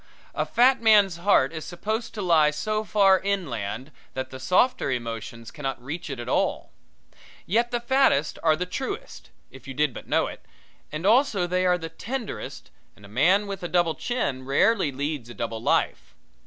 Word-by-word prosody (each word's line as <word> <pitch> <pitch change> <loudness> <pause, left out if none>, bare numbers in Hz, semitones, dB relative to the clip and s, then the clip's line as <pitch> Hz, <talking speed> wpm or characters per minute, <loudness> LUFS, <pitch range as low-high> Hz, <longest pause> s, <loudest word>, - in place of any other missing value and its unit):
A - - -1
fat 250 +2 +4
man's 205 -6 +5
heart 170 -6 +3
is 160 -1 -5
supposed 220 +6 -4
to 210 - -3
lie 160 -4 +4
so 215 +8 -2
far 195 -3 +4
inland 135 - -3 0.2
that 130 0 -4
the 130 - -8
softer 185 - +2
emotions 115 -2 -5
cannot 135 -4 -4
reach 150 +8 -6
it 135 -3 -5
at 120 - -6
all. - - 0 0.7
Yet 235 +6 +1
the 240 - -1
fattest 240 - +2
are 160 -1 +4
the 180 +3 -3
truest, 340 - -6 0.2
if 135 0 -14
you 135 - -7
did 150 -2 +1
but - - -10
know - - +2
it, - - -8 0.5
and 155 +4 -5
also 220 -4 +3
they 180 +1 +1
are 180 0 +3
the 165 -2 -6
tenderest 235 +6 -6 0.2
and 105 - -16
a - - -11
man 175 - +3
with 200 -1 -6
a 175 - -3
double 175 -2 +2
chin 140 - -2
rarely 150 - +2
leads 140 -2 -4
a 120 - -9
double 115 -1 -4
life. - - 0
175 Hz, 180 wpm, -25 LUFS, 135-210 Hz, 0.7 s, man's